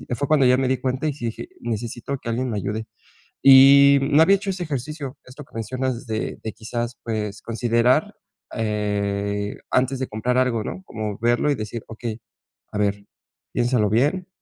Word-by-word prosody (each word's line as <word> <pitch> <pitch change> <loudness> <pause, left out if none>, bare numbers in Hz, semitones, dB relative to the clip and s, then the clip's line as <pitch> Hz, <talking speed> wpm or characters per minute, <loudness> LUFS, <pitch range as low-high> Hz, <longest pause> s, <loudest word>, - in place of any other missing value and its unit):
fue 140 +4 -2
cuando 145 -3 +4
ya 125 0 +5
me 135 - +1
di 130 +1 +1
cuenta 130 +4 -2
y 150 - 0
sí 135 -4 -6
dije: 115 - -5
"Necesito 120 +3 -4
que 115 - -6
alguien 125 +2 -1
me 105 - -2
ayude". 110 +3 -3 0.6
Y 140 +1 +8
no 145 +3 +4
había 195 +3 +5
hecho 195 0 -5
ese 185 -1 -2
ejercicio, 145 -2 -5
esto 130 +3 -11
que - - -29
mencionas 125 +2 -3
de 110 0 -3
de 110 - -3
quizás 120 +2 -4
pues, 105 -2 -3
considerar, 120 - +1 0.4
eh, 100 -2 -2
antes 130 +1 +1
de 130 - -2
comprar 125 +4 -1
algo, 125 -4 +1
¿no? 190 - -6
Como 105 -3 -5
verlo 120 +5 +2
y - - +1
decir: 110 0 -6
"Okey, 115 0 -6 0.5
a - - -4
ver, 100 -1 0 0.5
piénsalo 120 -3 +2
bien, 145 - +1
120 Hz, 180 wpm, -23 LUFS, 110-135 Hz, 0.6 s, Y